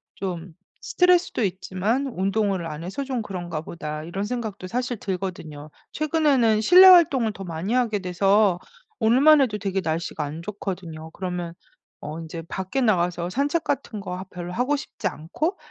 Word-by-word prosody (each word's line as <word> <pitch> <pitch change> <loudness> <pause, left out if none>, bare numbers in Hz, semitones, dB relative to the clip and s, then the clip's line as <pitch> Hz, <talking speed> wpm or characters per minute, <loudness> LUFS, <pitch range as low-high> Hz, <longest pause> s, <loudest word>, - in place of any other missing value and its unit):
좀 180 -3 -5 0.3
스트레스도 360 -9 +2
있지만 200 +7 -1
'운동을 195 -4 -1
안 155 +1 -6
해서 195 +10 -4
좀 255 -3 -2
그런가 175 -6 -5
보다.' 155 -2 -6
이런 190 +5 -4
생각도 215 -5 -4
사실 245 +3 -2
들거든요. 175 -6 -5 0.2
최근에는 285 -8 +2
실내 365 - +8
활동을 280 -11 +6
더 195 - -8
많이 170 +6 -3
하게 230 -5 +1
돼서 195 +1 +2 0.4
오늘만 270 +7 +6
해도 215 -5 +1
되게 195 -1 -2
날씨가 160 -1 -2
안 155 +3 -6
좋거든요. 175 -5 -6
그러면 180 -2 -4 0.5
어 155 +3 -6
인제 165 +1 -7
밖에 190 +8 -2
나가서 175 -5 +1
산책 290 - 0
같은 240 -6 -3
거 180 -2 -6
아 185 - -6
별로 175 0 -6
하고 255 +7 +1
싶지 285 - -4
않고 305 - -3
195 Hz, 335 characters per minute, -24 LUFS, 175-245 Hz, 0.5 s, 실내